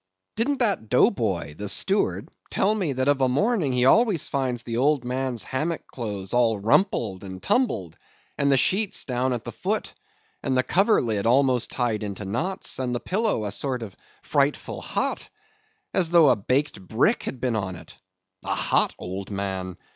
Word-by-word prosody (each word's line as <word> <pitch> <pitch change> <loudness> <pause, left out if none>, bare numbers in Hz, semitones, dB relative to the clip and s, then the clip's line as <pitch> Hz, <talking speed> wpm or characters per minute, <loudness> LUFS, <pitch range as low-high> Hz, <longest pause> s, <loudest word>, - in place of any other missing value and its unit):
Didn't 260 +6 0
that 200 - 0
Dough 125 - +5
Boy, 90 - -2
the 105 +3 -5
steward, 200 - +1 0.2
tell 200 +3 +2
me 185 -10 -1
that 130 +1 -1
of 145 -1 +3
a 130 - +3
morning 180 - +1
he 125 0 +2
always 210 - +4
finds 130 -3 -1
the 115 -1 -4
old 140 0 +2
man's 125 -2 -1
hammock 155 +5 -3
clothes 105 -6 -5
all 120 -3 +3
rumpled 110 - +1
and 95 -1 -7
tumbled, 110 - 0 0.4
and 140 0 +2
the 135 - +5
sheets 195 - +1
down 130 0 0
at 120 -3 -2
the - - -6
foot, - - -3 0.5
and 130 -1 0
the 130 - +3
coverlid 120 - +2
almost 130 -1 +3
tied 120 -4 -1
into 100 -1 -5
knots, 160 - -2
and 125 -2 -1
the - - -1
pillow 200 - 0
a 100 - -3
sort 125 +3 -2
of 100 -4 -9 0.3
frightful 145 0 0
hot, - - -2 0.6
as 175 -3 +2
though 165 -4 +6
a - - +5
baked 125 +2 -1
brick 115 - +1
had 130 - -5
been 125 -2 0
on 95 -4 -2
it? - - -13 0.5
A - - -1
hot - - +1
old 95 +2 -6
man! 95 -3 -4
125 Hz, 175 wpm, -25 LUFS, 105-155 Hz, 0.6 s, though